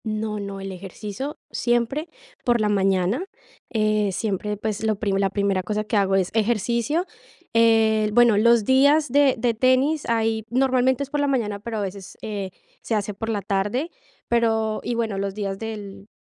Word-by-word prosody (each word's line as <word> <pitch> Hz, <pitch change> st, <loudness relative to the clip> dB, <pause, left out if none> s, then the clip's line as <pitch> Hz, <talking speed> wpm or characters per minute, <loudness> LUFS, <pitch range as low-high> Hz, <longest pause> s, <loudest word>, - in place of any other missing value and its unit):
No, 215 Hz, -1 st, -2 dB
no, 200 Hz, -1 st, -6 dB
el 195 Hz, 0 st, -6 dB
ejercicio 200 Hz, -, -6 dB
siempre 240 Hz, +7 st, 0 dB, 0.3 s
por 240 Hz, -2 st, +2 dB
la 210 Hz, -1 st, +1 dB
mañana, 195 Hz, -, +1 dB, 0.5 s
eh, 215 Hz, -2 st, +1 dB
siempre, 210 Hz, +1 st, -2 dB
pues, 215 Hz, +1 st, -3 dB
lo 220 Hz, -1 st, +1 dB
prim 200 Hz, -1 st, -1 dB
la 195 Hz, 0 st, +2 dB
primera 200 Hz, -1 st, 0 dB
cosa 210 Hz, +3 st, -2 dB
que 215 Hz, +1 st, -3 dB
hago 195 Hz, -1 st, +3 dB
es 190 Hz, -2 st, +1 dB
ejercicio. 235 Hz, -, 0 dB, 0.5 s
El 220 Hz, -2 st, +4 dB
bueno, 240 Hz, 0 st, +5 dB
los 235 Hz, 0 st, +4 dB
días 285 Hz, +4 st, +4 dB
de 280 Hz, -1 st, +4 dB
de 235 Hz, +1 st, +1 dB
tenis 260 Hz, +6 st, +2 dB
ahí 225 Hz, -1 st, +1 dB
normalmente 260 Hz, +1 st, +2 dB
es 280 Hz, -, -10 dB
por 295 Hz, -, -1 dB
la 285 Hz, -, +1 dB
mañana, 220 Hz, -7 st, -1 dB
pero 225 Hz, +2 st, -5 dB
a -, -, -1 dB
veces, 195 Hz, -1 st, -7 dB
eh, 205 Hz, -3 st, -4 dB, 0.3 s
se 225 Hz, -, -2 dB
hace 210 Hz, 0 st, -2 dB
por 225 Hz, +3 st, -5 dB
la 205 Hz, -3 st, -2 dB
tarde, 205 Hz, -, -1 dB, 0.4 s
pero 225 Hz, -2 st, +1 dB
y 240 Hz, -, -2 dB
bueno, 220 Hz, -4 st, -1 dB
los 195 Hz, 0 st, -3 dB
días 195 Hz, -2 st, -3 dB
del 210 Hz, -3 st, -7 dB
220 Hz, 180 wpm, -23 LUFS, 200-240 Hz, 0.5 s, bueno